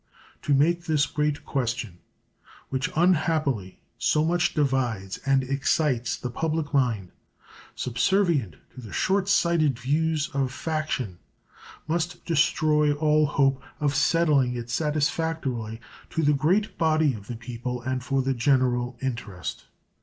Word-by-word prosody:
To 145 - +2
make 170 +5 +2
this 150 -3 +2
great 150 +1 -2
question, 120 -8 -2 0.7
which 130 +1 -1
unhappily 155 - +1 0.2
so 155 0 +2
much 175 +1 +1
divides 125 - 0
and 135 -1 +3
excites 135 -2 0
the 125 - -5
public 160 +2 -2
mind, 115 -9 +1 0.6
subservient 135 - +1 0.2
to 130 - -10
the 110 -4 -10
short 195 0 +1
sighted 165 -8 +3
views 155 +4 0
of 135 -2 0
faction, 145 - -3 0.7
must 170 +2 -2
destroy 150 -2 +2
all 150 0 +3
hope 135 -2 +2 0.2
of 145 -2 +1
settling 145 -4 +3
it 120 0 -5
satisfactorily 150 -6 -1 0.3
to 165 - -1
the 150 0 +4
great 180 +10 +1
body 155 -3 +3
of 100 -3 -9
the 120 - -5
people 120 +1 -5
and 130 0 -2
for 135 +1 0
the 135 +1 +1
general 125 -1 +1
interest. 110 -8 -5
140 Hz, 130 wpm, -26 LUFS, 125-155 Hz, 0.7 s, the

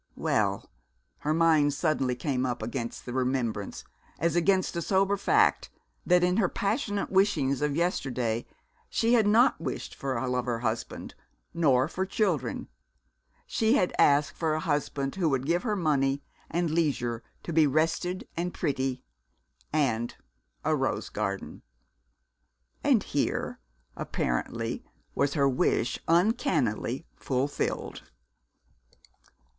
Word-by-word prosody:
Well - - 0 0.5
her 150 - -1
mind 155 -3 +4
suddenly 140 -6 +1
came 125 +1 -1
up 120 -3 -2
against 115 0 -4
the 125 - -5
remembrance, 125 -5 -1 0.3
as 170 +1 0
against 185 +2 +2
a 170 - -1
sober 195 +3 +2
fact, 415 - +2 0.4
that 180 0 +5
in 180 +2 +2
her 195 -6 +3
passionate 205 -1 -1
wishings 155 -9 +2
of 150 -1 0
yesterday 125 - -1 0.4
she 230 +1 +2
had 225 -4 +4
not 230 +5 +4
wished - - -4
for 135 -2 -3
a 130 - -2
lover 125 -2 -1
husband, 110 -1 -3 0.4
nor 140 -6 +3
for 185 +3 -2
children. 185 - -1 0.8
She 220 0 +2
had 180 - +2
asked 145 0 +4
for 160 -2 0
a - - -1
husband 145 -3 -1
who 170 -4 +2
would 135 -2 0
give 170 +3 +1
her 215 -3 -1
money, 140 -6 +1 0.3
and 170 -1 0
leisure 130 -8 0 0.2
to 170 - -5
be 155 -1 +5
rested 165 +5 0
and 175 +2 -2
pretty, 135 -5 -1 0.7
and 120 -6 0 0.5
a - - +3
rose - - -1
garden! 100 -2 -4 1.2
And - - +4
here, - - -1 0.4
apparently, 115 - -2 0.3
was 140 +2 0
her 140 -2 +3
wish 125 -2 +1
uncannily 165 - +1
fulfilled. 135 +2 -2
150 Hz, 125 wpm, -28 LUFS, 130-180 Hz, 1.2 s, that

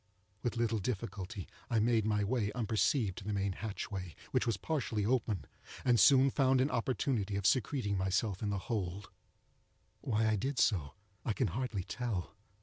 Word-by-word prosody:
With 120 - -2
little 115 -1 +1
difficulty 100 -1 -4 0.2
I 115 - +1
made 110 -1 +3
my 105 -1 +2
way 105 -1 0
unperceived 110 -2 +1
to - - -10
the 105 +1 -2
main 100 0 0
hatchway, 95 -3 -5 0.2
which - - +1
was 115 -4 +1
partially 110 - -1
open, 110 -4 0 0.4
and 120 -2 +4
soon 135 +4 +7
found 130 -1 +3
an 135 +3 +2
opportunity 115 -4 0
of 100 -1 -2
secreting 110 -4 +2
myself 95 +1 0
in 105 - -1
the 100 - 0
hold. 100 -4 -3 0.9
Why 110 -2 +1
I 110 -1 +2
did 135 +7 -2
so 80 -11 +2 0.3
I 110 - 0
can 125 +1 0
hardly 120 -7 -2
tell. 110 -5 -3
110 Hz, 165 wpm, -33 LUFS, 100-125 Hz, 0.9 s, soon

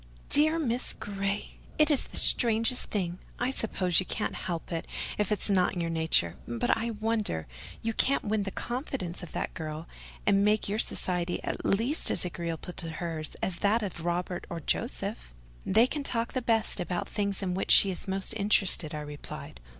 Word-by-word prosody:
"Dear 310 +3 +4
Miss 250 -6 -2
Grey! 200 0 -4 0.2
it 305 0 +4
is 285 - +3
the - - 0
strangest 230 +1 +5
thing. 180 -3 -2 0.2
I 245 +2 0
suppose 185 -8 +1
you 185 - -2
can't 215 - -2
help 170 -1 -5
it, 165 -1 -3 0.3
if 210 0 0
it's 210 - +2
not 190 -3 +2
in - - -3
your 165 0 -2
nature—but 120 - +1
I 230 +1 -2
wonder 215 - -1 0.4
you 225 0 -1
can't 275 +5 +2
win 215 0 0
the 195 - -2
confidence 240 - -4
of 175 - -9
that - - -3
girl, 155 +1 -6 0.4
and 200 -1 +4
make 210 +1 +2
your 205 +2 -1
society 180 -5 0
at - - -4
least 235 +10 +2
as - - +4
agreeable 170 0 -5
to 165 - -4
her 165 -1 -4 0.2
as 180 -2 -1
that 215 +4 +2
of 175 -4 -5
Robert 175 +1 -2
or 170 - -4
Joseph!" - - -3 0.3
"They 220 +5 +5
can 290 +3 -3
talk 235 -4 -2
the 255 - -1
best 225 -3 +1
about 180 0 -2
the - - -17
things 200 -1 0
in 180 -1 -1
which 190 - -3
she 195 - +8
is 185 - -6
most 190 0 +1
interested," 195 -6 +3
I 150 - -4
replied. 145 - -8
195 Hz, 190 wpm, -29 LUFS, 170-225 Hz, 0.4 s, she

